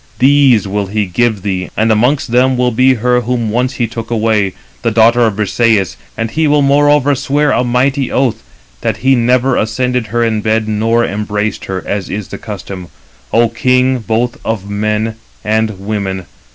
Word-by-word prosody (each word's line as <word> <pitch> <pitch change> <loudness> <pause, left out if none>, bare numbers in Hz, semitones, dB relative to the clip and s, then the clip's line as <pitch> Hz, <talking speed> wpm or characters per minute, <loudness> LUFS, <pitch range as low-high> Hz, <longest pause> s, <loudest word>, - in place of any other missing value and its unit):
These 135 -5 +4
will 100 0 -2
he 105 +1 -1
give 105 +2 0
thee, 95 -3 -2
and 110 +1 +2
amongst 125 +4 +1
them 130 +1 +3
will 125 0 +1
be 130 +3 +3
her 125 +1 +1
whom 120 -2 -2
once 125 +3 0
he 120 - -1
took 115 0 -6
away, 110 -4 +1 0.3
the 115 - +1
daughter 115 +2 +4
of 105 - -2
Briseïs; 105 -1 +1 0.2
and 115 0 -2
he 160 -1 +1
will 145 0 +3
moreover 145 0 +3
swear 145 +2 0
a 125 - +1
mighty 130 +2 0
oath, 130 -4 0 0.4
that 110 -3 -1
he 135 - +5
never 125 +1 +2
ascended 125 +2 -1
her 115 +2 0
bed, 110 0 0
nor 115 +2 +1
embraced 105 0 -3
her, 95 -1 -4
as 100 -3 -3
is 105 -1 -5
the - - -7
custom. 95 -4 -7 0.4
O 115 +1 +3
king, 125 +2 +1
both 115 +2 -2
of 105 -3 -3
men 105 +2 -2 0.3
and 110 -2 -1
women. 95 -2 -3
115 Hz, 175 wpm, -14 LUFS, 105-125 Hz, 0.4 s, he